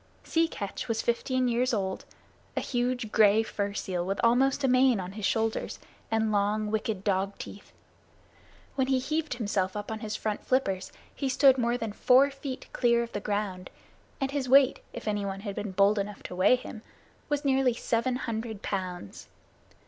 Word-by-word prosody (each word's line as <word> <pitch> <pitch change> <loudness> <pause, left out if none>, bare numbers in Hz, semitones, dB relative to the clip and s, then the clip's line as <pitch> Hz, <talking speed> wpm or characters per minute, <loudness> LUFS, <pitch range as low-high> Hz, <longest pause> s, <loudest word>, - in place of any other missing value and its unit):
Sea 330 0 +2
Catch 200 - -5
was 225 -1 -1
fifteen 255 +2 0
years 245 +1 +1
old, 190 -2 -3 0.5
a - - +4
huge 245 -3 -1
gray 215 0 +5
fur 205 -2 -3
seal 180 -4 -2
with 195 +2 -2
almost 265 +4 +3
a - - +4
mane 255 -3 +4
on 180 0 -5
his 205 0 -2
shoulders, 225 0 -1 0.3
and 220 -1 +1
long, 210 +1 +1
wicked 215 -2 -2
dog 195 0 0
teeth. 200 - -10 1.0
When 265 -1 0
he 265 -1 +3
heaved 305 +2 -2
himself 200 -4 -1
up 205 +1 -5
on 220 - -4
his 215 -1 -4
front 215 -1 -3
flippers 195 -8 0 0.2
he 275 - -2
stood 265 0 +5
more 240 0 +1
than 225 -3 -4
four 265 +5 +5
feet 275 -1 -6
clear 235 -1 +3
of 235 - -8
the 205 - -3
ground, 200 -3 -3 0.5
and 270 -1 -1
his 275 -3 -2
weight, 275 0 +6
if - - -8
anyone 200 -2 -2
had 200 -1 -4
been 205 0 -4
bold 200 +2 +3
enough 200 0 -5
to - - -7
weigh 185 +7 +5
him, 245 -3 -8 0.5
was 290 0 -1
nearly 265 -3 +3
seven 235 +2 0
hundred 225 -4 -4
pounds. 185 - -5
225 Hz, 180 wpm, -28 LUFS, 200-255 Hz, 1.0 s, weight